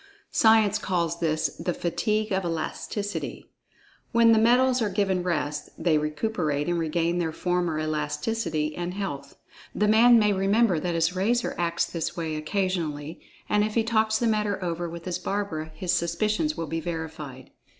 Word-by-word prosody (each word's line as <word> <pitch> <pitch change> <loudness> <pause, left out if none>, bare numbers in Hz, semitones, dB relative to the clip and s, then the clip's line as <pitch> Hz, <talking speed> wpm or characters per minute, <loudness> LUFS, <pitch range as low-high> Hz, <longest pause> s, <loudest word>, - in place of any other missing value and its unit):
Science 220 -2 +4
calls 170 -4 -1
this 155 -1 0
the 175 +1 -2
"fatigue 215 +5 -1
of 190 0 +1
elasticity." 175 +5 -4 0.6
When 230 -1 +5
the 225 - +5
metals 250 +2 +4
are 215 - +1
given 190 -2 0
rest, 150 -4 -2
they 160 -3 +2
recuperate 150 -2 -1
and 175 -1 0
regain 170 +2 0
their 165 -2 -1
former 175 -1 -1
elasticity 155 +1 -2
and 175 +1 -4
health. 145 -9 -5 0.4
"The 210 - +2
man" 235 +3 +7
may 210 -2 +4
remember 195 -1 +2
that 175 +2 -2
his 165 +2 +1
razor 230 +6 +1
acts 170 -1 0
this 165 0 -4
way 160 -2 -2
occasionally—and 165 +2 -2
if 215 0 -2
he 230 - +3
talks 220 -1 +2
the 235 - -1
matter 210 -2 +1
over 170 0 -2
with 170 0 -8
his 180 -2 -2
barber, 195 -6 -2
his 175 +2 -1
suspicions 215 - 0
will 165 - -2
be 165 +1 -3
verified. 160 -5 -6
175 Hz, 160 wpm, -26 LUFS, 160-210 Hz, 0.6 s, man